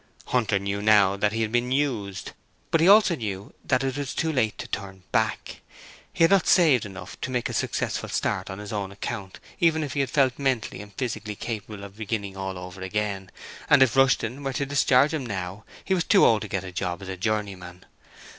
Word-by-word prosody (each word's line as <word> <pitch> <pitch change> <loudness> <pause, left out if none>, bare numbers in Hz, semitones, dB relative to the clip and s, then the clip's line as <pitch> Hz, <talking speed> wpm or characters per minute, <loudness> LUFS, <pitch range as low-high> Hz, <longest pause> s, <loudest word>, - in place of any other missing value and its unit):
Hunter 115 -5 +1
knew 100 +1 -3
now 105 -2 +5
that 105 +1 +1
he 115 +1 -1
had 110 - -2
been 120 +1 0
used, 115 -9 -1 0.4
but 165 - +3
he 170 - +5
also 200 -3 +7
knew 100 -5 -5
that 130 0 +1
it 135 0 -2
was 140 -2 -4
too 160 -1 0
late 110 -6 0
to - - -6
turn 95 -2 -6
back. - - -1 0.5
He - - +1
had 165 - +5
not 195 -2 +4
saved 145 - +5
enough 95 0 -10
to - - -3
make 125 -2 -1
a - - -6
successful - - -2
start 95 - -1
on 95 - -6
his 105 0 -7
own 100 -2 -3
account 100 -1 -6 0.2
even 160 -2 +3
if 140 -4 -4
he - - -2
had 135 - +1
felt 135 -3 +2
mentally 130 -8 -1
and 105 0 -12
physically 110 -4 -4
capable 105 -2 -6
of 100 0 -11
beginning 105 -3 -3
all 95 -1 -4
over 90 +1 -9
again, 95 0 -3 0.4
and 135 - +7
if 130 -2 +1
Rushton 135 0 +2
were 135 -1 -2
to 140 +1 -1
discharge 140 0 +3
him 150 -5 -2
right 105 -4 -3
now 95 +3 -6 0.2
he 190 - +1
was 180 -3 +1
too 200 +1 +5
old 110 -2 +4
to 105 - -5
get 95 -2 -3
a 95 - -7
job 90 0 -3
as - - -8
a 95 - -4
journeyman. 95 -3 -3
110 Hz, 220 wpm, -25 LUFS, 100-135 Hz, 0.5 s, also